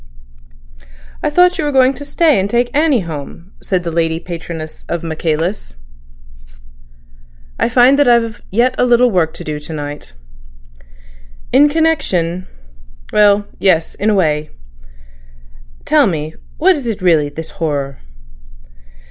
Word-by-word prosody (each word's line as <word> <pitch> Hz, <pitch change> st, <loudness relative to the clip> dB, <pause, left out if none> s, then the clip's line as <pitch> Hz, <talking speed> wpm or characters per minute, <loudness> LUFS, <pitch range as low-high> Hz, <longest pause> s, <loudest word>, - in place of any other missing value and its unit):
"I -, -, 0 dB
thought 360 Hz, +4 st, +3 dB
you -, -, 0 dB
were 295 Hz, -, -1 dB
going 265 Hz, -1 st, +4 dB
to 275 Hz, -, -9 dB
stay 305 Hz, -, +2 dB
and 195 Hz, +1 st, -1 dB
take 240 Hz, +4 st, 0 dB
Annie 295 Hz, -6 st, +3 dB
home," 165 Hz, +2 st, -8 dB
said 185 Hz, -2 st, -1 dB
the 170 Hz, -, -3 dB
lady 165 Hz, 0 st, 0 dB
patroness 165 Hz, -2 st, -8 dB
of 170 Hz, -1 st, -3 dB
Michaelis. 160 Hz, -, -3 dB, 1.8 s
"I -, -, +1 dB
find 250 Hz, +3 st, +4 dB
that 290 Hz, -, +4 dB
I've 230 Hz, -3 st, +2 dB
yet 240 Hz, +5 st, +2 dB
a -, -, +4 dB
little 245 Hz, 0 st, +4 dB
work 170 Hz, -5 st, +1 dB
to -, -, -8 dB
do 150 Hz, -1 st, -4 dB
to 150 Hz, +2 st, -9 dB
night." 145 Hz, -, -7 dB, 1.4 s
"In 290 Hz, +3 st, +6 dB
connection—?" 195 Hz, -, 0 dB, 0.7 s
"Well, 205 Hz, -1 st, +4 dB
yes—in 190 Hz, +3 st, +1 dB
a 210 Hz, -, +2 dB
way." 155 Hz, -5 st, 0 dB, 1.4 s
"Tell -, -, +4 dB
me, 155 Hz, -3 st, -3 dB, 0.2 s
what 370 Hz, +4 st, +4 dB
is 275 Hz, -5 st, -5 dB
it 215 Hz, -5 st, -4 dB
really—this 160 Hz, -2 st, +1 dB
horror?" 140 Hz, -4 st, -2 dB
190 Hz, 130 wpm, -16 LUFS, 160-250 Hz, 1.8 s, In